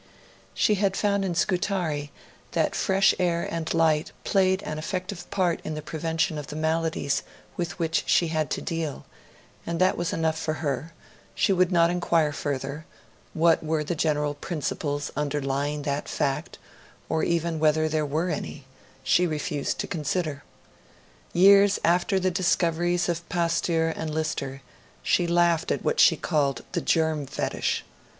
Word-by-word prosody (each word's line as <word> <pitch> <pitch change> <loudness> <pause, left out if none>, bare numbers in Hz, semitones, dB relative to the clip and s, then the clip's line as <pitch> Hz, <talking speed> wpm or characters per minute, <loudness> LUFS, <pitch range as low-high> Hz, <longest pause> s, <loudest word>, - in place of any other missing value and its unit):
She 215 - +3
had 195 -2 +1
found 200 -1 +1
in 180 -3 -2
Scutari 175 -5 0 0.4
that - - +1
fresh 195 0 +3
air 170 -2 +1
and 165 -1 -3
light 160 -2 +2
played 190 -1 +2
an 155 0 -4
effective 185 +2 -5
part 185 -4 +1
in 155 - -4
the 155 - -4
prevention 160 +1 -1
of 145 - -7
the - - -7
maladies 160 -2 0 0.3
with 175 0 -3
which 165 -2 +1
she 170 - +3
had 155 -3 -1
to - - -3
deal; 165 -4 -3 0.6
and 170 0 -3
that 185 0 +3
was 175 0 -1
enough 160 -1 0
for 155 -1 -2
her; 145 0 -3 0.4
she 195 - +3
would 185 0 +2
not 170 -1 +4
inquire 165 -3 +2
further; 140 +2 -4 0.5
what 165 0 +3
were 155 -1 0
the 150 - -2
general 150 -2 0
principles 145 -2 -3
underlying 145 0 -1
that 140 0 -2
fact 135 -1 -2 0.5
or 160 - 0
even 170 -1 0
whether 155 0 +3
there 155 0 0
were 155 +5 -1
any 140 -3 -5 0.4
she 175 +7 +3
refused 150 -2 -2
to - - -3
consider. 155 -3 -2 0.9
Years 200 +2 +6
after 175 +3 +2
the 185 0 +1
discoveries 175 -1 +1
of 170 0 -3
Pasteur 170 -1 +1
and 160 -1 -4
Lister, 140 -4 -3 0.4
she 175 - +2
laughed 170 -1 +2
at - - -1
what - - 0
she - - +6
called 140 -3 0
the 175 - -1
'germ 160 -4 +1
fetish'. - - -2
165 Hz, 155 wpm, -26 LUFS, 150-175 Hz, 0.9 s, Years